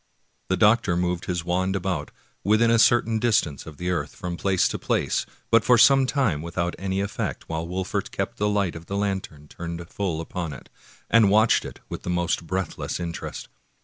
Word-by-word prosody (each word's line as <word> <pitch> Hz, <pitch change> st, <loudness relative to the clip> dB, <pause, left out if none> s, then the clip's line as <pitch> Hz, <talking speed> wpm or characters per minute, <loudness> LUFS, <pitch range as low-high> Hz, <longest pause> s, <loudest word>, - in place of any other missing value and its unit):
The -, -, +1 dB
doctor 105 Hz, -5 st, +4 dB
moved 90 Hz, 0 st, -1 dB
his 85 Hz, -2 st, -2 dB
wand 95 Hz, +2 st, 0 dB
about, 90 Hz, -5 st, -2 dB, 0.3 s
within 110 Hz, +4 st, +4 dB
a 115 Hz, -, +4 dB
cer 120 Hz, +1 st, +5 dB
tain 110 Hz, -1 st, -1 dB
distance 105 Hz, -, +1 dB
of 75 Hz, -3 st, -10 dB
the 90 Hz, +1 st, -2 dB
earth, 90 Hz, -, -3 dB
from 90 Hz, -1 st, -4 dB
place 95 Hz, 0 st, +2 dB
to -, -, -4 dB
place, -, -, 0 dB, 0.2 s
but 115 Hz, -1 st, +5 dB
for 125 Hz, +2 st, +5 dB
some 135 Hz, +3 st, +6 dB
time 125 Hz, -, +1 dB
without 85 Hz, +1 st, -2 dB
any 95 Hz, 0 st, -2 dB
efifect, 100 Hz, +1 st, -3 dB
while 80 Hz, 0 st, -4 dB
Wolfert 90 Hz, +1 st, -3 dB
kept -, -, -4 dB
the 105 Hz, 0 st, +1 dB
light 100 Hz, -4 st, +1 dB
of 80 Hz, +1 st, -9 dB
the 100 Hz, -, -3 dB
lantern 95 Hz, -7 st, -3 dB
turned 85 Hz, +1 st, -7 dB
full 90 Hz, -6 st, -2 dB
upon 80 Hz, -1 st, -4 dB
it, 65 Hz, -, -12 dB, 0.4 s
and 115 Hz, -3 st, +5 dB
watched 110 Hz, +3 st, +4 dB
it -, -, -9 dB
with -, -, -6 dB
the -, -, -6 dB
most 90 Hz, -1 st, 0 dB
breathless 95 Hz, -1 st, -3 dB
interest. 85 Hz, -1 st, -5 dB
90 Hz, 195 wpm, -25 LUFS, 85-105 Hz, 0.4 s, some